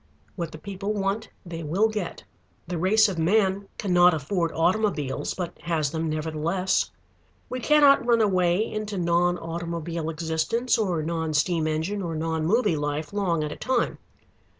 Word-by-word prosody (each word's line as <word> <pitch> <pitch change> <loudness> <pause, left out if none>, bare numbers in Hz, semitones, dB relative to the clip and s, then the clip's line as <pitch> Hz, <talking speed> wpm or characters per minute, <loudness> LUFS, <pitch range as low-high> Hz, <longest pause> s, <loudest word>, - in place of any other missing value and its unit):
What 170 -4 -4
the - - -8
people 200 +4 -4
want 200 +2 -2 0.2
they 170 -1 -6
will 175 +8 +2
get. 210 -5 -4 0.4
The 175 -1 -3
race 210 +5 +4
of 185 -4 -3
man 195 +3 +2
cannot 180 -3 +4
afford 165 +3 -1
automobiles, 165 -6 0
but 180 -3 -4
has 160 -4 -1
them 160 0 -2
nevertheless. 160 +4 0 0.6
We 255 - -3
cannot 290 0 +5
run 235 -1 +3
away 185 -1 +2
into 215 -2 -4
non 175 0 +2
automobile 170 -1 -4
existence 165 +10 0
or 180 -7 0
non 160 -1 -2
steam 160 +1 +1
engine 160 +6 -1
or 170 -3 -3
non 160 0 -1
movie 210 -4 +2
life 150 +2 -3
long 175 -6 0
at 150 - -3
a - - -5
time. 255 -2 -1
175 Hz, 155 wpm, -25 LUFS, 160-205 Hz, 0.6 s, cannot